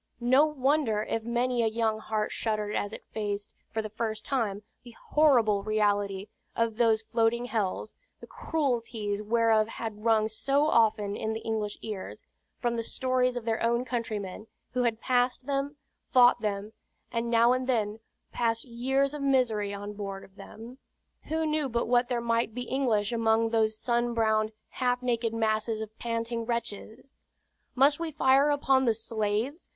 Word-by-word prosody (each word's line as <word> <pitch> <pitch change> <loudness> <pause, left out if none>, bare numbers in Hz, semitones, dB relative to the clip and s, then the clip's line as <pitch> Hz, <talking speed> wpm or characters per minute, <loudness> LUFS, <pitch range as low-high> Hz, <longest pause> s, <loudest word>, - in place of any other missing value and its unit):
No 260 +5 +4
wonder 270 -6 +1
if 225 - -2
many 240 +2 0
a 225 - +2
young 220 -1 0
heart 215 -1 -2
shuddered 215 -2 -2
as 205 - -1
it - - -9
faced, 205 -1 -4 0.2
for 220 -1 -2
the 215 - -5
first 220 0 -3
time, 215 -7 -1 0.2
the 240 -2 -14
horrible 240 -10 +4
reality 205 -2 0 0.3
of 230 -1 0
those 225 -2 +3
floating 230 +1 +1
hells, 215 -3 -2 0.3
the - - -10
cruelties 235 -8 -2
whereof 220 0 +3
had 220 -2 -6
rung 220 -1 +3
so 275 +6 +1
often 215 -6 +2
in 220 +1 -2
the 220 - -3
English 215 -2 -2
ears, 210 -4 -6 0.3
from 240 -1 -1
the - - 0
stories 255 +1 0
of 245 -2 -4
their 225 -1 -1
own 235 +2 +1
countrymen, 215 -4 -4 0.2
who 250 - 0
had 225 -2 0
passed 250 0 +1
them, 280 +1 -2 0.4
fought 245 -1 +6
them, 210 0 -3 0.4
and 230 0 -1
now 235 +1 +5
and 255 0 -2
then 220 -4 0 0.3
passed 230 -1 0
years 265 +3 0
of 295 - -5
misery 245 -7 +1
on 205 +1 -6
board 195 -1 -6
of 195 - -17
them. 235 +5 -11 0.5
Who 320 +1 -1
knew 305 -2 0
but 235 0 -1
what 245 +1 +3
there 240 -2 0
might 230 -1 0
be 250 - -3
English 240 -5 0
among 225 -1 +2
those 220 -1 +2
sun 240 0 0
browned, 220 -1 +2 0.2
half 250 -1 -1
naked 235 -2 0
masses 220 0 0
of 220 0 -7
panting 230 0 -2
wretches? 235 +2 -5 0.6
"Must 280 +3 +4
we 335 -1 -2
fire 275 -1 +4
upon 270 -2 +3
the 230 -2 +3
slaves?" 225 - -2
230 Hz, 165 wpm, -28 LUFS, 215-250 Hz, 0.6 s, fought